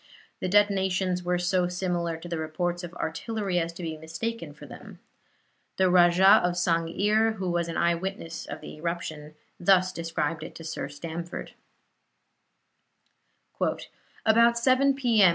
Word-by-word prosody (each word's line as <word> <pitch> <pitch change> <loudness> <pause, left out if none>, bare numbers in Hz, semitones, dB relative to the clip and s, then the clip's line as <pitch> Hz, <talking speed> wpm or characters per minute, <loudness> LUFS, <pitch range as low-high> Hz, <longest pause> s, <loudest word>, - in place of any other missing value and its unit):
The - - -2
detonations 190 -2 +2
were 180 0 0
so 180 0 +1
similar 175 -2 -2
to 165 - -10
the 170 -2 -3
reports 175 +3 -2
of 175 - -6
artillery 195 +3 -2
as 165 0 -2
to 175 - -8
be 160 -1 -4
mistaken 165 +9 -5
for - - -13
them. - - -11 0.8
The 185 -1 +3
Rajah 180 +3 +6
of 175 0 +1
Sang'ir, 185 +6 +1
who 185 -3 -2
was 170 -1 0
an 165 - -4
eye 170 0 +3
witness 185 -1 -5
of - - -7
the - - -9
eruption, 155 -2 -5 0.2
thus 185 0 +4
described 165 -2 -2
it - - -9
to 165 - -9
Sir 160 -3 -4
Stamford: 165 +4 -6 2.7
"About 235 +1 +5
7 260 +3 +3
P. 240 -5 +2
M. 190 - +8
180 Hz, 150 wpm, -27 LUFS, 165-195 Hz, 2.7 s, M